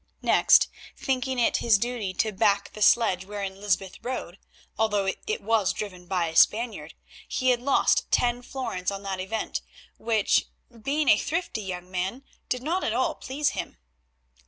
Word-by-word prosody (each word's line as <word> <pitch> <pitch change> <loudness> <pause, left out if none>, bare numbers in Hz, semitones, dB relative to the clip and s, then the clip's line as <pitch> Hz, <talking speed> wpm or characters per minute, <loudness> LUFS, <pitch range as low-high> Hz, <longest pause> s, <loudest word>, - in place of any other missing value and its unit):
Next, - - +5 0.3
thinking 260 -1 -1
it 240 - +3
his 225 -3 +4
duty 235 -3 -2
to 220 - +1
back 200 0 +1
the 215 - -9
sledge 210 -5 +4
wherein 195 -1 -6
Lysbeth 195 -2 -1
rode, 220 -7 -5 0.4
although 210 -3 +1 0.2
it 435 +2 -2
was 225 -4 +2
driven 180 -4 -7
by 180 -2 0
a 160 - -9
Spaniard, 230 +6 +2 0.3
he 255 0 +1
had 240 -1 0
lost 275 +2 +2
ten 245 0 +2
florins 245 -8 -4
on 200 0 -5
that 195 -1 -3
event, 215 +4 -3 0.4
which, 220 -3 +2 0.3
being 290 +5 0
a 210 - +6
thrifty 325 -6 -2
young 180 -2 -6
man, 190 +8 -3 0.3
did 250 0 -1
not 345 +6 -1
at 220 - 0
all 255 +2 +1
please 285 +3 -1
him. - - -6
220 Hz, 160 wpm, -26 LUFS, 195-250 Hz, 0.4 s, a